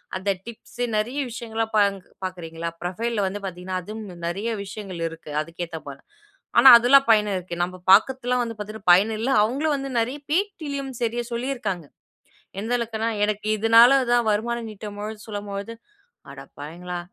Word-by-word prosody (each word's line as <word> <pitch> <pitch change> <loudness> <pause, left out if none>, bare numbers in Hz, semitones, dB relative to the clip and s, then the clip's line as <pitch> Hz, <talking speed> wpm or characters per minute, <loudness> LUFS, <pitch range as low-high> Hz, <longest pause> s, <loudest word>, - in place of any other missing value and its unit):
அந்த 190 +2 -2 0.2
டிப்ஸ், 235 +1 -10
நெறைய 240 +7 -1
விஷயங்கள்லாம் 225 -1 -4
பாங்க் 200 -3 +2 0.2
பாக்குறீங்களா 170 -2 -5
புரொஃபைல்ல 210 +5 -2
வந்து 200 +2 -4
பாத்தீங்கன்னா, 185 0 -4
அதுவும் 200 -4 -8
நிறைய 200 +7 -2
விஷயங்கள் 195 -3 -7
இருக்கு 165 -2 -11
அதுக்கு 165 +3 -6
ஏத்தபோல. 155 -4 -8 0.6
ஆனா 265 +2 +10
அதுல்லாம் 270 +4 +5
பயன் 210 -1 +4
இருக்கு. 180 -1 -5
நம்ம 180 +1 -4 0.2
பாக்குத்துலாம் 250 +4 +4
வந்து 230 -1 -5
பாத்தீங்கன்னா 210 -1 -5
பயன் 195 +5 +5
இல்லை. 255 +4 0
அவுங்களும் 285 +7 0
வந்து 275 -1 -4
நெறைய 250 +5 -1
பேட்டிலயும் 305 -8 -2
சரியா 240 +1 -1
சொல்லியிருக்காங்க. 235 - -3 0.8
எந்த 225 +3 -4
அளவுக்குனா, 230 -1 -2 0.2
எனக்கு 210 0 -3
இதுனால 230 +5 +7
தான் 240 -1 +4
வருமானம் 230 +2 -1
ஈட்டும்பொழுது 210 +1 -7
சொல்லும்பொழுது, 205 +1 -5 0.6
"அடப்பாவிங்களா! 160 +6 -8
215 Hz, 140 wpm, -24 LUFS, 185-235 Hz, 0.8 s, ஆனா